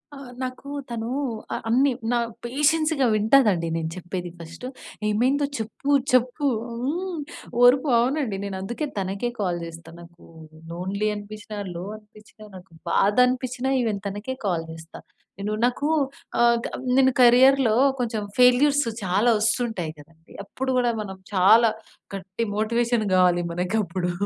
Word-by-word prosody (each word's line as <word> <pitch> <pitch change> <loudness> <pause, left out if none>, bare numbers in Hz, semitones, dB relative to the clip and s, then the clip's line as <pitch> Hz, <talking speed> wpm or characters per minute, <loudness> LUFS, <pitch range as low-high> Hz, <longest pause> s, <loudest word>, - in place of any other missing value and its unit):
ఆ! - - -10 0.2
నాకూ, 255 +2 -6 0.2
తనూ 230 0 -4 0.4
ఆహ్, - - -3
అన్నీ. 265 +4 +3 0.2
నా 245 - +2 0.3
పేషెన్స్‌గా 295 +2 +2
వింటదండి 215 -5 +3
నేను 160 -1 -2
చెప్పేది 180 0 -5
ఫస్ట్. 170 +8 -10 0.4
ఏమైందో 260 +7 +2
చెప్పు, 225 +6 -4 0.2
చెప్పు 255 +4 +2 0.2
హ్మ్. 310 +8 -3 0.4
ఓర్పు 260 +4 +5
అవునండి. 250 -4 0
నేనందుకే 200 +8 -4
తనకే 195 +5 -2
కాల్ 180 -4 -1
జేస్తా, 165 0 -11
నాకూ 170 0 -15 0.5
లోన్లీ 190 +5 -2
అనిపిచ్చినా, 210 +1 -8 0.2
లో 170 - -5
అనిపిచ్చినా, 215 0 -18
నాకు 185 0 -13 0.2
బాధనిపిచ్చినా 250 +6 +2
ఈవెన్ 215 -4 -1
తనకే 205 +6 -5
కాల్ 170 -4 -1
జేస్తా. 160 0 -11 0.4
నేను 205 +2 -2
నాకూ 270 +4 0 0.5
ఆహ్, 235 0 +5
కబ్ - - -5 0.2
నేను 265 -1 +5
కరియర్‌లో 250 -1 +6 0.2
కొంచెం 230 -3 -2 0.2
ఫెయిల్యూర్స్ 275 +4 +5 0.2
చాలా 195 +6 +2
ఒస్తుంటాయి 220 -6 0
కదండి. 160 +2 -18
అప్పుడు 260 +6 -4
గూడా 245 -1 +2
మనం 190 -2 -7 0.2
చాలా 220 +5 +6 0.5
గట్టి 190 +4 -5
మోటివేషన్ 230 +1 +1
గావాలి 180 -1 +4
మనకప్పుడు. 180 0 -1
220 Hz, 125 wpm, -24 LUFS, 190-255 Hz, 0.5 s, కరియర్‌లో